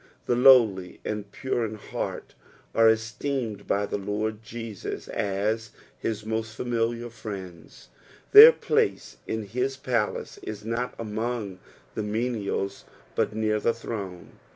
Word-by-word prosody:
The 120 - +2
lowly 115 -8 +5
and 105 -1 -4
pure 125 -2 -2
Id 110 -1 -3 0.2
heart - - -4 0.4
are 115 0 +6
esteemed 115 +1 -2
by 100 +1 +1
the 100 - -3
Lord 105 +2 -2
Jeaua 115 -2 -6
as 105 +3 -1 0.3
his 110 -1 -4
most 110 0 -3
familiar 120 0 -1
friends, 95 - -9 0.4
their 435 +4 +12
place 455 -2 0
in 110 0 -2
his 125 +6 -2
palace 120 -5 -2
is 105 -1 -7
not 115 +2 -2
among 110 -3 -3 0.3
the - - -3
meniala 105 -2 -2 0.3
but 105 - 0
near 110 -1 +1
the 115 +2 +1
throne. 100 -6 -6
110 Hz, 130 wpm, -26 LUFS, 105-120 Hz, 0.4 s, their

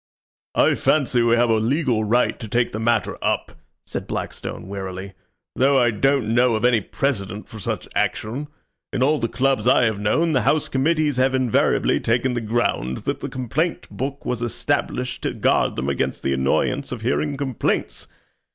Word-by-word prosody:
"I - - +4
fancy 130 -5 +2
we 115 0 +4
have 120 0 +3
a 110 - +4
legal 120 0 +1
right 120 +4 +1
to 110 - -6
take 120 +3 +1
the 110 - -4
matter 115 -1 0
up," - - -1 0.3
said - - -5
Blackstone, - - -5
wearily; 95 0 -6 0.4
"though 135 +1 +4
I 120 -1 +3
don't 120 0 +1
know 120 0 +4
of 110 - 0
any 120 -3 +4
precedent 105 -4 -3
for 110 - -10
such 95 - -3
action. 130 +7 -1 0.4
In 130 - 0
all 150 +3 +3
the 115 - 0
clubs 125 -1 0
I 125 - +5
have 110 -3 +1
known 160 +11 +1
the 135 -4 +2
house 145 +6 +2
committees 150 +1 +1
have 130 +1 +2
invariably 130 -3 +2
taken 125 +3 +1
the 120 - -2
ground 110 - -1
that - - -1
the - - -5
complaint 140 +7 -2
book 140 +1 -5
was 125 -2 -2
established 125 +1 -2
to - - -2
guard - - +2
them 65 +1 -3
against 70 - -1
the 70 - +1
annoyance 70 - 0
of 125 -3 -5
hearing 140 +4 -1
complaints. 135 -4 -2
120 Hz, 180 wpm, -22 LUFS, 110-135 Hz, 0.4 s, I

